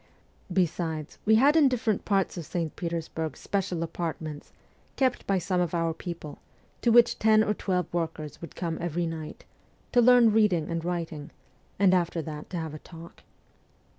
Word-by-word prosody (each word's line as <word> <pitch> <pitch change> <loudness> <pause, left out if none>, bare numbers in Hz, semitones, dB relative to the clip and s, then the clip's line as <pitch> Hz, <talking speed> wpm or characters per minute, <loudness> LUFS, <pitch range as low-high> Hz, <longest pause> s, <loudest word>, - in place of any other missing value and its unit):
Besides, 165 -4 -1
we 220 - +5
had 280 +7 +5
in 310 -4 +6
different 225 -5 -1
parts 195 -3 +1
of 170 - -5
St. 165 -3 -3
Petersburg 165 -2 -4
special 185 -4 -2
apartments, 160 -3 -5 0.4
kept 260 -2 0
by 195 - +2
some 180 0 0
of 175 -1 -1
our 165 -1 0
people, 165 -3 -7 0.4
to 235 - +3
which 235 0 +5
ten 215 0 +5
or 210 - +1
twelve 180 -3 -1
workers 160 -3 -4
would 170 - -9
come 165 -3 -3
every 175 0 -1
night 160 -2 -6 0.5
to 245 - +5
learn 240 -1 +6
reading 190 -8 +2
and 165 -1 -2
writing, 165 -4 -4 0.5
and 190 -1 +4
after 175 -2 +1
that 150 -1 -7
to 180 - -4
have 160 -2 -4
a 155 - -7
talk. 165 +1 -13
175 Hz, 165 wpm, -27 LUFS, 160-200 Hz, 0.5 s, in